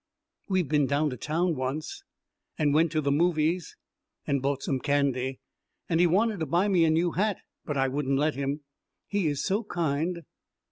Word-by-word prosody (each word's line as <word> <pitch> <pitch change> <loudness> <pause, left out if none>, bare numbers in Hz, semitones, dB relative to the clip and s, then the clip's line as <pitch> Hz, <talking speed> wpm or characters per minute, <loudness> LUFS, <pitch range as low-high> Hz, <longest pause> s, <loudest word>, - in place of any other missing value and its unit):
We 185 -1 +3
have 165 - -5
been 145 -2 +2
down 145 +2 +1
to - - -4
town 165 +7 0
once, 150 - -4 0.5
and 150 -3 +2
went 160 +1 +3
to 155 - +1
the 140 -1 0
movies 165 +2 +1 0.5
and 140 -2 0
bought 140 0 -1
some 135 - -1
candy, 135 -2 0 0.5
and 165 -1 +1
he 175 - +5
wanted 205 +4 +2
to 160 - -2
buy 175 +8 +2
me 175 -4 +4
a - - +3
new 165 +2 +2
hat, 205 +2 0 0.3
but 145 -3 -2
I 135 0 +2
wouldn't 135 0 0
let 150 +2 +2
him. 140 +2 -3 0.4
He 200 -5 0
is 145 -2 -1
so 205 +3 0
kind.... 170 -2 -1
155 Hz, 190 wpm, -27 LUFS, 140-175 Hz, 0.5 s, he